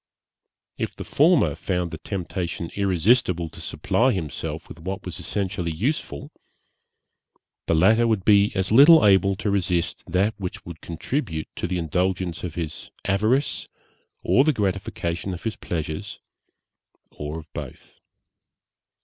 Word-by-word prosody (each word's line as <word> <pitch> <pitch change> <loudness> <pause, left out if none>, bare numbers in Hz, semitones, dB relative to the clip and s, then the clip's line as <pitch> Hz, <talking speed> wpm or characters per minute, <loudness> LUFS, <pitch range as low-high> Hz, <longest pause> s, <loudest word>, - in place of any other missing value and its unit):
If - - -3
the - - -6
former - - +3
found 90 -2 -2
the 80 - -6
temptation 90 -3 -4
irresistible 95 -2 +2
to - - -11
supply 130 +3 +1
himself 80 -8 -4
with 85 - -11
what 95 +3 -5
was - - -6
essentially 95 -4 -2
useful 80 - -3 1.4
the - - +3
latter 110 +8 +5
would 110 -5 0
be 100 -1 +5
as 95 0 -1
little 145 +6 +8
able 95 -1 +5
to 105 +1 -2
resist 90 -4 0
that 100 +4 +1
which 90 -2 -6
would 85 -2 -9
contribute 85 - -3
to - - -3
the 90 0 -2
indulgence 90 +1 -1
of 85 -3 -5
his 80 -3 -5 0.2
avarice 110 +8 +1 0.6
or 135 - +4
the 155 +1 +3
gratification 95 -4 -2
of 85 - -11
his 110 -1 -2
pleasures, 85 +4 -5 0.9
or 75 +2 -6
of 80 -2 -11
both. - - -9
95 Hz, 135 wpm, -24 LUFS, 85-105 Hz, 1.4 s, little